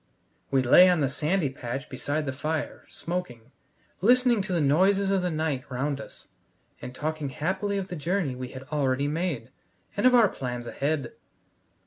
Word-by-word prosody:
We 135 -1 +2
lay 180 +9 +8
on 175 -3 +2
the 135 - +2
sandy 150 +1 0
patch 130 +2 -5
beside 145 +4 -3
the 135 - -2
fire, 155 +3 -4
smoking, 130 -9 -5 0.5
listening 245 +1 +4
to 190 0 -5
the 175 - +2
noises 190 +7 +3
of 195 -1 +2
the 180 - 0
night 155 -5 -1
round 140 +2 -2
us, - - -13 0.5
and 125 +1 -8
talking 155 0 -3
happily 190 +8 -2
of 195 0 -4
the 180 - -4
journey 170 -1 -1
we 125 0 -6
had 130 +1 -9
already 140 -2 +1
made, 150 -6 -2 0.4
and 205 +5 +4
of 250 - +5
our 230 -3 +7
plans 125 -7 -5
ahead. 140 +1 -2
150 Hz, 170 wpm, -27 LUFS, 130-185 Hz, 0.5 s, lay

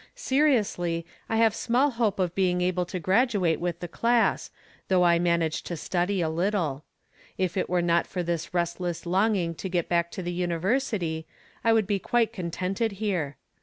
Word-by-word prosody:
Seriously, 230 - +1 0.2
I 225 - 0
have 225 -1 +4
small 250 +5 +2
hope 230 -5 0
of 180 -3 0
being 180 -2 +1
able 180 0 0
to 185 - -4
graduate 190 -2 +2
with 175 0 -3
the 175 - -4
class, 235 +6 +1 0.4
though 185 -1 +3
I 170 -1 +4
manage 170 -2 +1
to 170 - -4
study 180 +4 -1
a 165 - +1
little. 165 -4 -1 0.5
If 185 -2 -1
it 190 - -1
were 180 -1 +1
not 170 0 +2
for 180 -2 -3
this 170 -1 -3
restless 175 0 -2
longing 185 -1 +1
to 190 +4 -6
get 175 -2 -1
back 170 -1 +1
to 185 - -5
the 175 0 -3
University 175 -1 -1 0.4
I 230 - +4
could 220 -2 +3
be 200 0 0
quite 230 +2 +1
contented 185 +3 -2
here. 185 -9 -2
180 Hz, 175 wpm, -27 LUFS, 170-210 Hz, 0.5 s, have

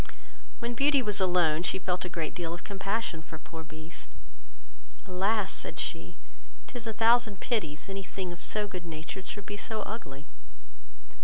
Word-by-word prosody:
When 235 0 -1
Beauty 275 +2 +5
was 210 -2 +2
alone, 175 -4 +5
she 180 - +2
felt 185 -1 0
a - - -2
great 165 -3 -2
deal 170 -2 -2
of 175 - -10
compassion 195 -3 -1
for 160 0 -8
poor 160 +1 -8
Beast. 155 +1 -9 1.0
"Alas, 195 +2 +2
(said - - -3
she,) - - 0 0.5
'tis 240 -2 -5
a - - +1
thousand 225 -2 +5
pities 155 - 0
any 195 0 -3
thing 185 -2 -4
so 210 +4 +2
good 180 -3 -5
natured 170 +3 -5
should 205 -1 -4
be 205 - -4
so 215 0 -2
ugly." 145 -10 -6
190 Hz, 160 wpm, -31 LUFS, 165-215 Hz, 1.0 s, Beauty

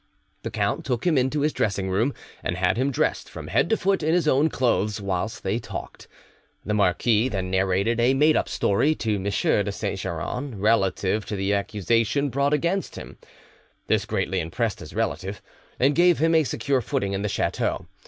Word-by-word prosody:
The - - -4
count - - -1
took 125 +3 -2
him 175 -3 +3
into 130 +3 +1
his 150 +1 +1
dressing 100 -2 -1
room, 110 +9 0 0.3
and 85 - -2
had 90 +1 +2
him 130 +4 +1
dressed 135 - -1
from - - -8
head - - +2
to 225 - +3
foot 195 -1 +1
in 160 +2 +2
his 175 -3 +1
own 150 +2 +4
clothes, 110 -6 0
whilst 100 +2 -3
they 100 +4 0
talked. - - -8 0.6
The 105 - -1
marquis 105 +4 +2
then 95 -4 -3
narrated 95 +5 +1
a 125 +3 +3
made 150 +3 +4
up - - 0
story 140 +10 +2
to 110 -6 -1
M. 95 - -5
de 100 0 +1
Saint 100 -1 -3
Geran 100 - -4
relative 105 -1 +1
to 105 - -3
the 95 +1 0
accusation 115 +6 0
brought 140 +3 +1
against 170 +6 0
him. - - -10 0.7
This - - +1
greatly 95 +1 -1
impressed 105 +6 -2
his - - -10
relative, 95 +7 -2 0.4
and 135 +3 +4
gave 175 +2 +4
him 165 +2 +2
a 160 -2 +4
secure 130 +2 0
footing 100 -2 -2
in 95 - -2
the 105 - -1
chateau. - - -1
110 Hz, 190 wpm, -24 LUFS, 95-140 Hz, 0.7 s, own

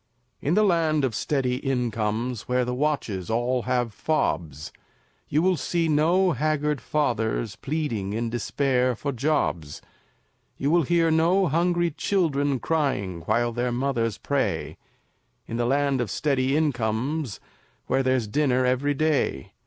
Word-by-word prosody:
In 155 +5 +1
the 215 - +4
Land 160 -6 +2
of 125 - -2
Steady 130 +1 0
Incomes, 120 -3 -2
Where 125 0 +2
the 125 - -2
watches 125 - -1
all 120 +2 0
have 120 -3 0
fobs, 80 - -2 0.6
You 155 +3 +2
will 185 -1 +3
see 165 +4 0
no 170 +5 +3
haggard 150 0 0
fathers 115 -7 -1
Pleading, 130 -10 -3
in 115 +2 -1
despair, 125 +1 0
for 140 +5 -3
jobs; 120 - -1 0.8
You 140 +2 0
will 170 +1 +5
hear 165 -1 +3
no 170 +5 +3
hungry 175 +2 +1
children 145 -7 0
Crying, 115 - -1
while 120 +2 +2
their 120 +1 -1
mothers 120 -4 -1
pray, 140 -1 -1 0.7
In 115 - -5
the 120 0 0
Land 140 0 +1
of 115 - -2
Steady 135 - +1
Incomes, 130 -1 -1 0.5
Where 135 - +1
there's 130 -3 +1
dinner 130 +1 +1
every 130 +3 +1
day. 145 - 0
135 Hz, 135 wpm, -25 LUFS, 120-155 Hz, 0.8 s, will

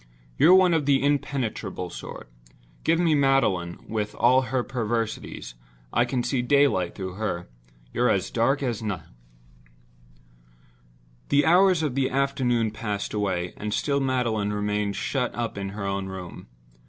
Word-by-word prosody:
"You're 180 - +7
one 185 -2 +5
of 155 -4 +1
the 140 -1 +3
impenetrable 120 - -2
sort. - - -8 0.6
Give 165 - +3
me 170 -3 +3
Magdalen, 135 -12 +1
with 105 -1 -3
all 130 +2 +4
her 125 0 -1
perversities; 115 - -3 0.4
I 120 - +3
can 125 0 -1
see 130 -1 0
daylight 130 -9 +2
through 95 -2 -5
her. 90 -5 -3 0.5
You're - - +2
as - - 0
dark 135 +5 +1
as 120 -5 -2
night." 100 -7 -3 2.3
The 145 0 +4
hours 180 0 +5
of 150 -5 -1
the 135 0 +1
afternoon 130 -4 +1
passed 105 -2 -4
away, 95 -4 -1
and 105 0 -3
still 140 -1 0
Magdalen 120 -6 0
remained 105 -1 -1
shut 125 -3 -2
up 120 -1 -3
in 100 -1 -4
her 100 0 -5
own 100 0 -2
room. 95 -6 -8
120 Hz, 145 wpm, -25 LUFS, 105-135 Hz, 2.3 s, You're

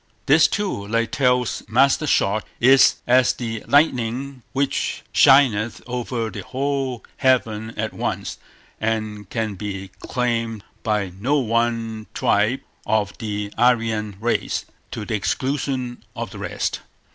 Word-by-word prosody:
This, 150 +3 +6
too, 195 - -2
like 115 +1 0
Tell's 125 -3 +1
master 135 +6 +3
shot, 105 -4 +2 0.2
is 130 +2 +6
as 125 0 +4
the 115 -3 -5
lightning 135 -2 +1
which 140 0 -1
shineth 120 -5 +5
over 120 -2 -3
the - - -6
whole 135 -2 -2
heaven 115 -5 +1
at - - -2
once, - - -3 0.4
and 110 -2 -2
can 110 -3 -2
be 95 0 -6
claimed 115 -4 -2 0.2
by 105 -4 -1
no 140 +8 +2
one 115 -3 -1
tribe - - +2 0.2
of 105 -2 0
the 105 -1 -4
Aryan 115 -4 +2
race, 120 +2 -1 0.2
to 105 - -5
the 115 - -4
exclusion 130 +3 -2
of - - -5
the - - -9
rest. - - -2
115 Hz, 125 wpm, -22 LUFS, 110-130 Hz, 0.4 s, This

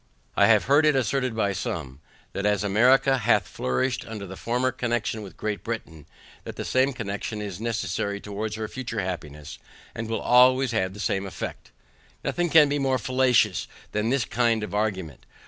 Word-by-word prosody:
I - - +5
have - - +5
heard 145 +4 +4
it 150 - +4
asserted 130 -1 0
by 100 -3 +1
some, 70 -7 -5 0.3
that 100 - -3
as 105 -1 +1
America 130 +6 +4
hath - - +2
flourished 120 - -1
under 110 -3 -6
her 95 0 -8
former 125 +5 0
connexion 120 -3 -2
with 100 -3 -11
Great 105 -1 -3
Britain, 85 -10 -6 0.4
that - - -8
the - - -5
same 130 +2 +2
connexion 110 -3 -4
is 100 -2 -6
necessary 100 -3 -2
towards 105 +1 -4
her 110 0 -4
future 120 -2 -4
happiness, 75 -5 -6 0.3
and 115 0 -5
will 115 - -1
always 130 +1 +5
have 95 -4 -1
the - - -10
same 100 -1 -1
effect. 95 - -7 0.5
Nothing 175 -1 0
can 155 -2 +7
be 145 +1 -1
more 135 -1 +1
fallacious 125 -5 +2 0.2
than 105 +2 0
this 130 -3 +1
kind 115 -2 +1
of 105 - -6
argument. 95 - -2
110 Hz, 180 wpm, -25 LUFS, 100-130 Hz, 0.5 s, can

